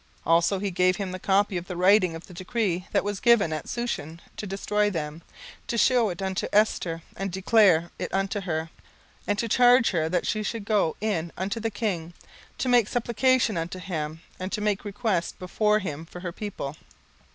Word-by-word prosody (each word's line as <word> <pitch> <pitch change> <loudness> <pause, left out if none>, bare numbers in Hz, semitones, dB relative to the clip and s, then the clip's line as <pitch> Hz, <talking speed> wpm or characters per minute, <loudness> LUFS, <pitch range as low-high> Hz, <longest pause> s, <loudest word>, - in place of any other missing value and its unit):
17:004:008 - - +1
Also 170 +4 +3
he 195 +1 -2
gave 185 +1 +3
him 195 -1 -4
the 185 - -5
copy 195 0 +2
of 175 0 -6
the 180 - -5
writing 185 -1 +4
of 165 - -9
the 180 - -13
decree 185 -1 -2
that - - +2
was 205 -1 -3
given 235 -9 +4
at 155 - -5
Shushan 170 -10 -3 0.2
to 210 - -5
destroy 205 +2 0
them, 160 -3 -4 0.5
to 235 - -2
shew 240 -2 +4
it 185 +2 -5
unto 190 -1 -1
Esther, 175 -6 +1
and 195 -1 -3
to 185 - -4
declare 185 -5 +4
it - - -4
unto 195 +1 -1
her, 160 -3 -3 0.6
and 205 - +1
to 230 - -1
charge 245 +1 +5
her 160 -4 0
that 175 0 0
she 215 - 0
should 215 0 -4
go 200 -7 +1
in 175 -6 -1
unto 195 +5 -2
the 225 0 -1
king, 185 -6 -3 0.4
to - - -2
make 245 -4 +4
supplication 245 -2 +2
unto 165 +3 -3
him, 160 -4 -4 0.2
and 185 +1 -4
to - - -2
make 210 -1 0
request 205 -4 -2
before 210 +3 +1
him 165 -6 -5
for 175 - -10
her 180 -2 -4
people. 175 -7 -5
195 Hz, 200 wpm, -26 LUFS, 170-215 Hz, 0.6 s, charge